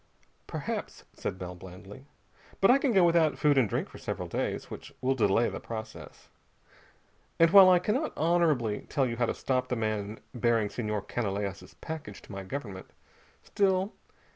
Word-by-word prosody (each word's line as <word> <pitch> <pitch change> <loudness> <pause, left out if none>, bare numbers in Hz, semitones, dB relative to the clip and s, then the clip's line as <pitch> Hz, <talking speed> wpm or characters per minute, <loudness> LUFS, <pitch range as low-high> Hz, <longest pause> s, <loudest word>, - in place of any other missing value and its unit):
"Perhaps," - - -5
said 95 - -4
Bell 90 -1 -6
blandly: 95 +8 -12 0.5
"but 195 - +6
I 270 - +5
can 275 -2 +1
go 190 -5 +5
without 165 -3 +3
food 150 -1 +3
and 130 -6 +3
drink - - -1
for - - -13
several - - -4
days, - - -3
which - - -8
will 130 +1 +1
delay 115 -2 +2
the - - -5
process. 110 -1 -8 1.1
And 165 0 +5
while 195 -1 +9
I 180 - +7
cannot 230 - -1
honorably 155 -10 +1
tell 135 - +1
you 115 -2 -3
how 120 -1 +1
to - - -2
stop 130 -1 -1
the 125 - -1
man 110 -1 -2
bearing 115 -4 +1
Senhor 105 -3 -3
Canalejas' 100 -3 -4
package 150 -11 -7
to - - -13
my 95 -1 -5
government, 100 -3 -6 0.6
still 195 0 +1
120 Hz, 165 wpm, -29 LUFS, 105-165 Hz, 1.1 s, while